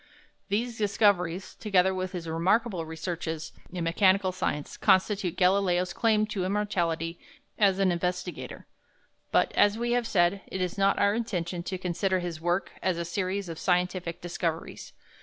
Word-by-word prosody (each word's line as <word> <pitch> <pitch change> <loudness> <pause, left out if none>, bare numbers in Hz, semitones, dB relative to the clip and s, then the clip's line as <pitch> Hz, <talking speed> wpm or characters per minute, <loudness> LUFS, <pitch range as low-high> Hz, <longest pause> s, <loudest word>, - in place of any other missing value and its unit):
These 225 +3 -1
discoveries, 195 -4 +1
together 190 -3 +2
with 185 0 -3
his 170 -2 -5
remarkable 180 +2 +1
researches 160 -1 -4 0.2
in 180 -1 -3
mechanical 185 +3 +3
science, 165 -5 -3
constitute 190 -2 +2
Galileo's 180 -1 +2
claim 215 -2 +2
to 205 -3 -3
immortality 175 -4 -1 0.4
as 195 -3 +4
an 195 -2 +3
investigator. 180 +1 -3 0.7
But, - - +3
as 205 +1 +4
we 240 +1 -1
have 240 -1 +1
said, 180 0 +2
it 190 - -5
is 180 -1 -1
not 195 0 +2
our 200 0 +3
intention 180 -6 -2
to 185 +2 -4
consider 185 +1 0
his 175 -3 -4
work 175 +3 0
as 185 -2 0
a 170 - -2
series 185 +2 -2
of 165 -1 -6
scientific 180 -1 0
discoveries. 170 -2 -4
185 Hz, 150 wpm, -28 LUFS, 175-200 Hz, 0.7 s, as